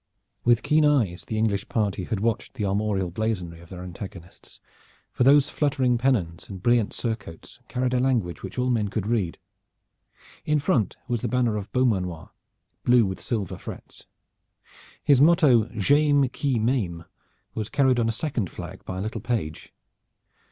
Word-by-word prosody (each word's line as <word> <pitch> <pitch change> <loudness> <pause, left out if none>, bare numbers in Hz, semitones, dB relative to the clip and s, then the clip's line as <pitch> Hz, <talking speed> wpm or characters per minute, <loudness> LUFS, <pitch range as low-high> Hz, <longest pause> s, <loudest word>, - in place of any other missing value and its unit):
With 120 -1 +3
keen 155 0 +3
eyes 120 -12 +2
the 110 - -3
English 105 -3 0
party 100 -4 -1
had 110 -4 -3
watched 115 +3 -1
the 110 -5 -2
armorial 100 -2 0
blazonry 90 -5 -3
of 85 0 -15
their 90 -1 -8
antagonists, 90 -1 -10 0.5
for - - +1
those 140 +2 +6
fluttering 130 -5 +1
pennons 105 -11 0
and 95 -2 -7
brilliant 120 +1 +2
surcoats 110 -8 -5
carried 125 0 -1
a 125 - +2
language 115 - 0
which - - -8
all 125 0 +1
men 110 -4 +1
could 100 0 -3
read. 105 -7 -1 1.1
In 150 0 +2
front 125 -8 0
was 120 -2 -1
the 125 - -1
banner 120 -1 +1
of 105 -1 -5
Beaumanoir, 95 -10 0 0.5
blue 120 -2 +5
with 95 -1 -4
silver 105 -6 -3
frets. - - -10 1.0
His 140 -2 +5
motto 150 - +5
"J'ayme 140 +5 +3
qui 135 -4 0
m'ayme" 110 -8 -1 0.5
was 110 -1 -4
carried 130 -3 +3
on 115 -1 +1
a - - +2
second 120 - -2
flag - - -9
by 95 - -5
a - - -3
little 110 +3 -4
page. 110 -11 -3
115 Hz, 160 wpm, -25 LUFS, 95-125 Hz, 1.1 s, those